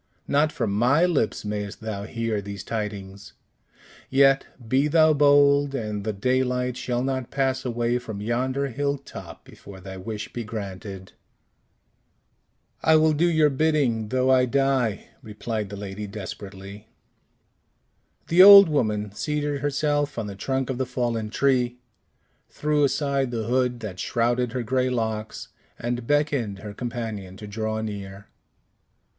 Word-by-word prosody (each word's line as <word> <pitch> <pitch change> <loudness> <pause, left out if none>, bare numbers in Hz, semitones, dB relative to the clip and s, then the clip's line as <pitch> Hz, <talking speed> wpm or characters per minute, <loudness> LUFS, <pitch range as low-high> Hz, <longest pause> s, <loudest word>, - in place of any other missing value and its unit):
"Not 150 +2 +2
from 115 -5 -2
my 125 - +3
lips 145 -12 0
mayst 105 -1 -4
thou 105 -2 -5
hear 115 -2 -2
these 100 0 -7
tidings; 100 -3 -6 0.8
yet, 135 0 +4 0.2
be 135 +5 +2
thou 155 0 +5
bold, 145 -1 +4
and 105 -5 -3
the 110 - -1
daylight 125 +3 0
shall 125 -1 -2
not 130 -2 -2
pass 135 -1 0
away 120 0 0
from 110 -4 -7
yonder 130 +5 -1
hill 140 +3 -1
top 140 - -11
before 95 -1 -13
thy 95 +1 -9
wish 105 +2 -6
be 120 - -4
granted." 100 -3 -7 1.7
"I 160 - +4
will 155 0 +4
do 170 +4 +2
your 155 -3 +3
bidding 135 -7 +1
though 130 +3 +1
I 130 -1 +5
die," 135 -4 0
replied 110 -2 -5
the 100 - -7
lady 100 +1 -6
desperately. 100 0 -9 1.4
The 170 +2 +5
old 200 -2 +11
woman 105 -8 0
seated 145 +4 -2
herself 145 0 0
on 115 - -2
the 100 - -6
trunk 135 +5 -2
of 130 - -5
the 130 - -1
fallen 120 -3 -2
tree, 125 0 +1 0.7
threw 150 0 0
aside 140 -2 0
the 115 -2 -3
hood 125 +1 0
that 95 -4 -6
shrouded 120 +1 0
her 125 -2 -2
gray 130 +2 0
locks, 110 -3 -3 0.3
and 120 0 -3
beckoned 145 -9 0
her 105 +1 -8
companion 110 -5 -5
to 105 - -9
draw 110 +1 -3
near. 100 -2 -7
120 Hz, 140 wpm, -24 LUFS, 105-140 Hz, 1.7 s, old